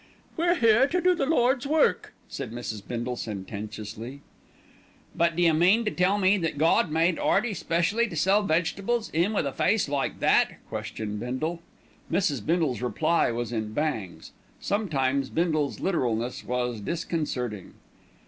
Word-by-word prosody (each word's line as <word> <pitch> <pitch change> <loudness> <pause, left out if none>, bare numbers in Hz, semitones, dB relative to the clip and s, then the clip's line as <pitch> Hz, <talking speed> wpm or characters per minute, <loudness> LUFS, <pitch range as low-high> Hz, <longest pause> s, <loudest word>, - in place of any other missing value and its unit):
"We're 345 +2 +2
here 235 -2 +4
to 360 +5 0
do 365 +1 +4
the 275 -6 -1
Lord's 260 -3 +2
work," 315 +2 +1
said - - -6
Mrs. 115 -3 -5
Bindle 120 +1 -3
sententiously 110 +4 -7 0.9
"But 170 -1 +2
d'you 170 -1 +3
mean 185 +9 +4
to 210 - 0
tell 185 +3 +2
me 195 0 +3
that 165 -4 -2
Gawd 160 +2 +3
made 165 +2 +1
'Earty 215 +2 +1
specially 185 +7 0
to 185 - -8
sell 195 +6 +3
vegetables, 200 +6 -1
'im 170 +6 +2
with 200 -8 0
a 140 - -1
face 215 +7 +1
like 140 -1 -2
that?" - - +3
questioned 105 -1 -5
Bindle. 155 +9 -3 0.5
Mrs. 145 - 0
Bindle's 160 -5 0
reply 155 +7 +1
was 120 0 -3
in 110 -2 -3
bangs. 115 - -3 0.3
Sometimes 140 -10 0
Bindle's 155 -4 0
literalness 125 - -1
was 125 -3 -2
disconcerting. 130 - -3
160 Hz, 145 wpm, -26 LUFS, 125-200 Hz, 0.9 s, here